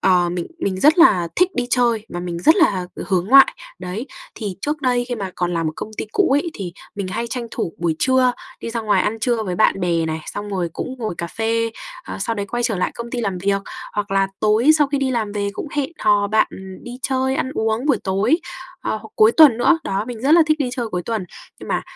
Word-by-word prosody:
ờ, 180 Hz, -2 st, +3 dB
mình 175 Hz, -1 st, -3 dB
mình 190 Hz, -, -2 dB
rất 310 Hz, -, +5 dB
là 185 Hz, -, +5 dB
thích 360 Hz, +1 st, +3 dB
đi 245 Hz, -1 st, -1 dB
chơi 235 Hz, -3 st, +2 dB
và 175 Hz, -, -5 dB
mình 175 Hz, -1 st, -4 dB
rất 315 Hz, -, +5 dB
là 195 Hz, -, +2 dB, 0.2 s
hướng 185 Hz, -2 st, 0 dB
ngoại. 275 Hz, -, +7 dB, 0.2 s
Đấy, 210 Hz, +9 st, -5 dB, 0.3 s
thì 205 Hz, -5 st, -5 dB
trước 295 Hz, +4 st, -2 dB
đây 245 Hz, -1 st, +2 dB
khi 245 Hz, -, -1 dB
mà 200 Hz, -5 st, -4 dB
còn 175 Hz, -1 st, -1 dB
làm 165 Hz, -1 st, 0 dB
ở -, -, -4 dB
công 215 Hz, -, -6 dB
ty -, -, -3 dB
cũ 395 Hz, -, +3 dB
ấy 290 Hz, +5 st, +2 dB
thì 180 Hz, -4 st, -6 dB, 0.2 s
mình 200 Hz, -2 st, -4 dB
hay 230 Hz, +5 st, -3 dB
tranh 240 Hz, 0 st, -4 dB
thủ 165 Hz, -, -3 dB
buổi 165 Hz, -2 st, 0 dB
trưa, 260 Hz, -1 st, +3 dB, 0.3 s
đi -, -, -5 dB
ra 230 Hz, 0 st, -2 dB
ngoài 215 Hz, -2 st, +2 dB
ăn 225 Hz, +2 st, -1 dB
trưa 235 Hz, -1 st, +1 dB
với 185 Hz, -4 st, -3 dB
bạn 215 Hz, -, +3 dB
bè 170 Hz, -2 st, +1 dB
này, 160 Hz, 0 st, -3 dB
xong 205 Hz, 0 st, -6 dB
rồi 185 Hz, -4 st, -2 dB
cũng 260 Hz, -, -5 dB
ngồi 220 Hz, -6 st, -3 dB
cà 170 Hz, -, -2 dB
phê, 230 Hz, +3 st, -1 dB, 0.3 s
ờ, -, -, -6 dB
sau 230 Hz, -, -1 dB
đấy 200 Hz, -2 st, -3 dB
quay 240 Hz, +4 st, -2 dB
trở 230 Hz, -4 st, 0 dB
lại 180 Hz, -, 0 dB
công 235 Hz, 0 st, -7 dB
ty 245 Hz, -, -2 dB
làm 195 Hz, -5 st, -2 dB
việc, 195 Hz, +1 st, 0 dB, 0.3 s
hoặc 205 Hz, -1 st, -3 dB
là 195 Hz, 0 st, +2 dB
tối 215 Hz, +6 st, +4 dB
sau 295 Hz, -, +4 dB
khi 280 Hz, 0 st, -1 dB
đi 270 Hz, -1 st, 0 dB
làm 220 Hz, -4 st, -1 dB
về 205 Hz, -1 st, -1 dB
cũng 290 Hz, -, -6 dB
hẹn 285 Hz, 0 st, 0 dB
hò 205 Hz, -1 st, +3 dB
bạn 215 Hz, +2 st, +3 dB, 0.4 s
đi 245 Hz, -, -8 dB
chơi, 265 Hz, 0 st, 0 dB
ăn 260 Hz, -, -1 dB
uống 220 Hz, +4 st, -1 dB
buổi 275 Hz, -7 st, +3 dB
tối, 200 Hz, -, +2 dB, 0.4 s
ờ, -, -, -3 dB
hoặc 220 Hz, +1 st, -10 dB
cuối 215 Hz, +1 st, +6 dB
tuần 290 Hz, -7 st, +7 dB
nữa, 325 Hz, +7 st, +4 dB
đó, 195 Hz, +2 st, -1 dB
mình 240 Hz, -3 st, -6 dB
rất 280 Hz, +3 st, +3 dB
là 335 Hz, 0 st, +8 dB
thích 310 Hz, -1 st, +2 dB
đi 275 Hz, -4 st, 0 dB
chơi 245 Hz, -3 st, -3 dB
cuối 180 Hz, -4 st, -3 dB
tuần. 220 Hz, -1 st, -3 dB, 0.4 s
Nhưng -, -, -9 dB
mà -, -, 0 dB
220 Hz, 255 wpm, -20 LUFS, 195-255 Hz, 0.4 s, là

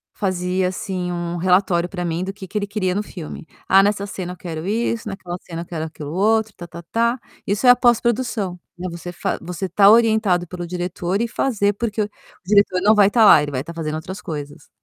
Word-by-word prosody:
fazia, 185 Hz, -1 st, 0 dB
assim, 185 Hz, -1 st, -4 dB
um 175 Hz, 0 st, -3 dB
relatório 180 Hz, -1 st, +2 dB
para 180 Hz, -2 st, -4 dB
mim 170 Hz, +1 st, -2 dB
do 190 Hz, -, -3 dB
que 200 Hz, -1 st, -10 dB
que 210 Hz, -, -4 dB
ele 205 Hz, -1 st, -1 dB
queria 190 Hz, -3 st, -1 dB
no 205 Hz, -, 0 dB
filme. 165 Hz, -5 st, -8 dB, 0.2 s
"Ah, 195 Hz, +1 st, +6 dB
nessa 200 Hz, 0 st, +1 dB
cena 180 Hz, -3 st, -5 dB
eu -, -, -13 dB
quero 165 Hz, -2 st, -6 dB
isso, 225 Hz, +2 st, -1 dB
naquela 190 Hz, -3 st, -6 dB
cena 165 Hz, -1 st, -7 dB
eu -, -, -14 dB
quero 160 Hz, -2 st, -4 dB
aquilo 150 Hz, -2 st, -8 dB
outro, 220 Hz, +3 st, +2 dB
tá-tá-tá". 175 Hz, +9 st, -2 dB, 0.3 s
Isso 205 Hz, +6 st, 0 dB
é -, -, +9 dB
a 245 Hz, -, +9 dB
pós-produção, 235 Hz, -5 st, +1 dB, 0.2 s
né. 180 Hz, +1 st, -4 dB
Você 170 Hz, +1 st, -7 dB
fa 175 Hz, -, -2 dB
você 180 Hz, +2 st, -4 dB
tá 195 Hz, +3 st, +5 dB
orientado 215 Hz, -5 st, +4 dB
pelo 175 Hz, 0 st, -6 dB
diretor 180 Hz, +2 st, -2 dB
e 235 Hz, -, 0 dB
fazer, 215 Hz, -4 st, 0 dB
porque 215 Hz, 0 st, -2 dB
o 205 Hz, -, -5 dB, 0.4 s
diretor 200 Hz, -1 st, +3 dB
não 210 Hz, +3 st, +5 dB
vai 205 Hz, -1 st, +6 dB
tá 225 Hz, -1 st, +5 dB
lá, 155 Hz, -, +8 dB
ele 145 Hz, 0 st, -3 dB
vai 130 Hz, -1 st, -2 dB
tá 170 Hz, -, -8 dB
fazendo 155 Hz, -2 st, -3 dB
outras 180 Hz, +4 st, -6 dB
coisas, 145 Hz, -4 st, -7 dB
185 Hz, 215 wpm, -21 LUFS, 175-210 Hz, 0.4 s, é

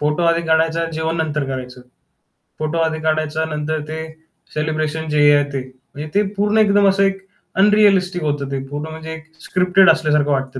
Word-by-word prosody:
photo 150 Hz, +3 st, 0 dB
आधी 170 Hz, 0 st, +2 dB
काढायचा 160 Hz, +1 st, +2 dB
अन् 165 Hz, -, -3 dB
जेवण 160 Hz, +1 st, -2 dB
नंतर 150 Hz, -3 st, -1 dB
करायचं, 130 Hz, -1 st, -6 dB, 0.8 s
फोटो 155 Hz, +1 st, -2 dB
आधी 160 Hz, -1 st, 0 dB
काढायचा 155 Hz, 0 st, -1 dB
नंतर 155 Hz, +1 st, -2 dB
ते 160 Hz, +1 st, -5 dB, 0.5 s
सेलिब्रेशन 155 Hz, +1 st, -2 dB
जे 150 Hz, 0 st, +1 dB, 0.2 s
आहे 145 Hz, -, +3 dB
ते, 135 Hz, -, -2 dB, 0.3 s
म्हणजे 150 Hz, +2 st, -6 dB
ते 205 Hz, -, +4 dB
पूर्ण 205 Hz, +2 st, +1 dB
एकदम 205 Hz, -2 st, +4 dB
असं 195 Hz, +1 st, +2 dB
एक 195 Hz, -1 st, -1 dB, 0.4 s
अनरिअलिस्टिक 195 Hz, -4 st, +3 dB
होतं 145 Hz, -2 st, -2 dB
ते 135 Hz, -, -2 dB
पूर्ण 145 Hz, +2 st, -5 dB
म्हणजे 160 Hz, 0 st, -7 dB
एक 160 Hz, 0 st, -10 dB, 0.2 s
स्क्रिप्टेड 185 Hz, 0 st, +3 dB
असल्यासारखं 150 Hz, -1 st, +1 dB
वाटतं 135 Hz, -1 st, -2 dB
160 Hz, 175 wpm, -19 LUFS, 150-180 Hz, 0.8 s, ते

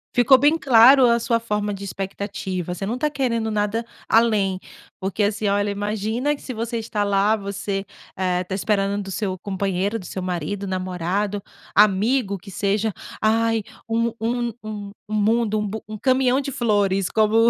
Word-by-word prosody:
Ficou 245 Hz, +2 st, +6 dB
bem 290 Hz, +5 st, +4 dB
claro 255 Hz, 0 st, +7 dB
a 235 Hz, 0 st, +3 dB
sua 230 Hz, 0 st, +1 dB
forma 210 Hz, -2 st, -2 dB
de 200 Hz, 0 st, -7 dB
expectativa. 195 Hz, -2 st, -4 dB
Você 185 Hz, +2 st, -4 dB
não 230 Hz, +5 st, -2 dB
tá 300 Hz, -, +1 dB
querendo 240 Hz, -6 st, -1 dB
nada 210 Hz, +2 st, 0 dB, 0.2 s
além. 210 Hz, -5 st, +3 dB, 0.4 s
Por 190 Hz, +1 st, -2 dB
que 210 Hz, -, 0 dB
assim, 210 Hz, +1 st, 0 dB
olha, 205 Hz, +1 st, +1 dB
imagina 215 Hz, +7 st, -1 dB
que -, -, -16 dB
se 255 Hz, -, -6 dB
você 230 Hz, +1 st, -3 dB
está 220 Hz, -2 st, -2 dB
lá, 200 Hz, +1 st, +3 dB
você, 200 Hz, -1 st, -3 dB, 0.3 s
eh, 180 Hz, -1 st, 0 dB
tá 185 Hz, -, -6 dB
esperando 200 Hz, 0 st, 0 dB
do 195 Hz, -, -8 dB
seu 190 Hz, -1 st, -2 dB
companheiro, 195 Hz, +2 st, -1 dB
do 190 Hz, -, -9 dB
seu 185 Hz, -, -5 dB
marido, 185 Hz, +2 st, -3 dB
namorado, 185 Hz, +2 st, -2 dB, 0.3 s
amigo, 210 Hz, +2 st, +3 dB
que 195 Hz, +2 st, -12 dB
seja, 205 Hz, +3 st, 0 dB, 0.3 s
"Ai, 225 Hz, 0 st, +2 dB, 0.3 s
um 230 Hz, 0 st, +1 dB
um 240 Hz, +1 st, -1 dB
um 210 Hz, -2 st, -6 dB, 0.2 s
um -, -, -4 dB
mundo, 215 Hz, 0 st, +2 dB
um 210 Hz, -, -2 dB
bu 220 Hz, +2 st, -5 dB
um 215 Hz, 0 st, -6 dB
caminhão 260 Hz, +2 st, +2 dB
de 275 Hz, 0 st, -4 dB
flores, 200 Hz, -6 st, +1 dB
como 220 Hz, +1 st, +4 dB
210 Hz, 175 wpm, -22 LUFS, 195-230 Hz, 0.4 s, claro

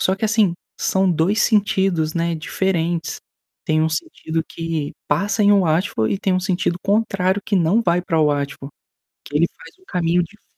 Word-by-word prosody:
só 190 Hz, -, +2 dB
que 210 Hz, -, -3 dB
assim, 215 Hz, -5 st, +2 dB, 0.3 s
são 190 Hz, -1 st, +2 dB
2 175 Hz, +6 st, +2 dB
sentidos, 190 Hz, -7 st, +1 dB
né, 170 Hz, 0 st, 0 dB
diferentes. 170 Hz, 0 st, -1 dB, 0.5 s
Tem 155 Hz, 0 st, +2 dB
um 160 Hz, -, +2 dB
sentido 160 Hz, +1 st, -3 dB
que 165 Hz, -3 st, -4 dB, 0.2 s
passa 200 Hz, +8 st, +1 dB
em 205 Hz, 0 st, +6 dB
Watford 160 Hz, -, +1 dB
e -, -, -3 dB
tem 190 Hz, -, 0 dB
um 185 Hz, -, +1 dB
sentido 180 Hz, -2 st, -1 dB
contrário 195 Hz, -2 st, +1 dB
que 210 Hz, -, -1 dB
não 185 Hz, +6 st, +3 dB
vai 175 Hz, -3 st, +2 dB
para 165 Hz, -2 st, 0 dB
Watford, 140 Hz, -1 st, -1 dB, 0.5 s
que 145 Hz, -, -11 dB
ele 165 Hz, +3 st, +4 dB
faz -, -, -14 dB
um -, -, -24 dB
caminho 175 Hz, -1 st, +1 dB
dif 210 Hz, +5 st, -18 dB
175 Hz, 175 wpm, -20 LUFS, 160-195 Hz, 0.5 s, em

